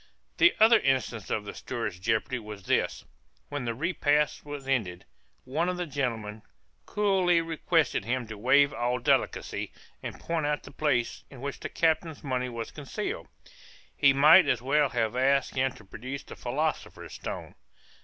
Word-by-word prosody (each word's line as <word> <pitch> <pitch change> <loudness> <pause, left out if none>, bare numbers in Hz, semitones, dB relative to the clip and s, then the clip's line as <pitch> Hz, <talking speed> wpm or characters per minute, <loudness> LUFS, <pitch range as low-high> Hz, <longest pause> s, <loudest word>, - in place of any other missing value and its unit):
The 345 - +5
other 225 +1 +7
instance 130 - 0
of 105 - -1
the - - -6
steward's 105 -6 -4
jeopardy 110 +5 0
was 105 -3 -9
this; - - 0 0.4
when 140 -4 -4
the 115 -1 -2
repast 150 0 +1
was 145 -2 -7
ended, 105 -10 -1 0.4
one 160 +7 -1
of 180 - -2
the 180 - -2
gentlemen 115 -7 -3 0.5
coolly 190 -4 +2
requested 165 - 0
him 120 +3 -1
to 110 0 -8
waive 130 +6 +4
all 120 +2 0
delicacy, 120 - 0 0.3
and - - -7
point 165 -3 -1
out 150 0 -1
the - - -11
place 130 -6 0
in 135 - -12
which 140 +2 -5
the - - -5
captain's 160 -1 0
money 125 -2 -1
was 115 -1 -6
concealed. 145 -3 -5 0.7
He 140 - +5
might 155 +7 +7
as 125 - +2
well 140 +3 +2
have 115 -1 -1
asked 135 +1 +2
him 130 0 +1
to 110 - -15
produce 130 +8 -7
the - - -10
philosopher's 150 +6 -3
stone. - - -6
135 Hz, 165 wpm, -28 LUFS, 120-155 Hz, 0.7 s, other